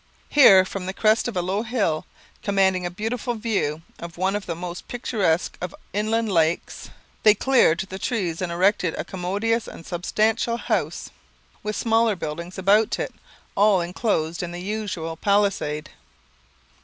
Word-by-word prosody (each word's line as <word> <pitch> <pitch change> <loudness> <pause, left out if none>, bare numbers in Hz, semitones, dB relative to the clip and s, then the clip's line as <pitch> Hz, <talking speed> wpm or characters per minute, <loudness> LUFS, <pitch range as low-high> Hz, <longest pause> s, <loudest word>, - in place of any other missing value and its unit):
Here, 195 -10 +7
from 185 -1 -6
the 190 - -4
crest 220 +2 +3
of 230 -6 -4
a 180 - +1
low 190 +4 -1
hill, 220 -10 -1 0.3
commanding 190 -3 +2
a - - -4
beautiful 225 +6 -3
view 200 -9 -1 0.2
of 170 -1 -8
one 190 +3 +1
of 205 - -4
the 170 - -2
most 175 +1 -7
picturesque 205 -8 0
of 180 -1 -5 0.2
inland 215 +2 0
lakes, 165 -1 0 0.3
they 215 -1 +6
cleared 245 -9 +4
the 190 0 -7
trees 185 -9 -2
and 180 -2 -2
erected 180 -1 +2
a - - -2
commodious 205 +5 -1
and 165 - -10
substantial 215 +6 0
house, - - -2 0.5
with 210 0 -3
smaller 225 -1 +2
buildings 170 +2 -6
about 205 +3 +3
it, - - -4 0.4
all 200 -1 +4
enclosed 170 -2 -1
in 175 -1 -4
the 175 - -6
usual 190 -5 -4
palisade. 200 -7 0
195 Hz, 155 wpm, -23 LUFS, 175-215 Hz, 0.5 s, Here